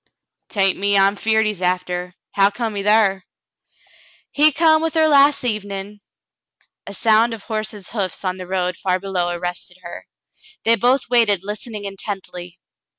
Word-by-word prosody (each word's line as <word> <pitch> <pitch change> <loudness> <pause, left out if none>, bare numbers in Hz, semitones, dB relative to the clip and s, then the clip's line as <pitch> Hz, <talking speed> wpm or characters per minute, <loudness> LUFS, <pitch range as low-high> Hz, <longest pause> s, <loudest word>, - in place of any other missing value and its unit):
" - - -65 0.2
'Tain't 195 -2 +1
me 200 0 +2
I'm 195 +1 +4
feared 220 +1 +1
he's 210 -4 -3
after. 180 0 -2 0.2
How 195 0 +4
come 225 +1 -4
he 200 - -3
thar 210 -1 +3
^ - - -22 0.6
" - - -28
"He 300 +2 +4
come 315 +1 +3
with 325 0 -2
her 315 -1 +4
las' 285 -1 +4
evenin' 205 -3 -4 0.3
— - - -50
" - - -40
A 200 - -6
sound 225 +2 +3
of 210 - -14
horses' 215 -3 -5
hoofs 200 -3 -3
on 185 0 -1
the 185 -1 -8
road 180 -1 -2
far 185 -1 -1
below 185 -2 -2
arrested 175 +1 -5
her. 170 - -9 0.6
They 230 +1 +4
both 250 +4 +1
waited, 225 -6 +3
listening 210 +1 -6
intently. 190 -3 -7
200 Hz, 175 wpm, -20 LUFS, 185-225 Hz, 0.6 s, I'm